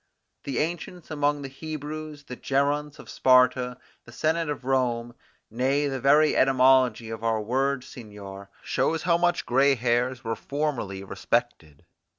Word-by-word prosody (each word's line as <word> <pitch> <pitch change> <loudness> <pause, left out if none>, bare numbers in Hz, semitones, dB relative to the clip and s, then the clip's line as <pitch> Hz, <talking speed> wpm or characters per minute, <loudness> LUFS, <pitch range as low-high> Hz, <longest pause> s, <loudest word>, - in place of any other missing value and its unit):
The 140 - -3
ancients 170 +1 -4
among 145 -1 0
the - - -4
Hebrews, 155 +1 -7
the 125 -3 -8
Geronts 145 +3 -1
of - - -13
Sparta, 125 -1 +3 0.3
the 120 - -14
Senate 160 +4 0
of 145 -3 -5
Rome, 120 -3 0 0.4
nay, 135 +5 +1
the 135 -1 -3
very 150 +4 +4
etymology 130 -3 +3
of 115 0 -7
our 115 -1 +1
word 130 +4 0
seigneur, 100 -5 -10
show 165 - 0
how 170 +1 +1
much 175 0 +1
gray 135 +3 +3
hairs 120 +1 0
were 115 -1 -2
formerly 135 -10 -3
respected. 100 - -3
135 Hz, 145 wpm, -26 LUFS, 120-145 Hz, 0.4 s, very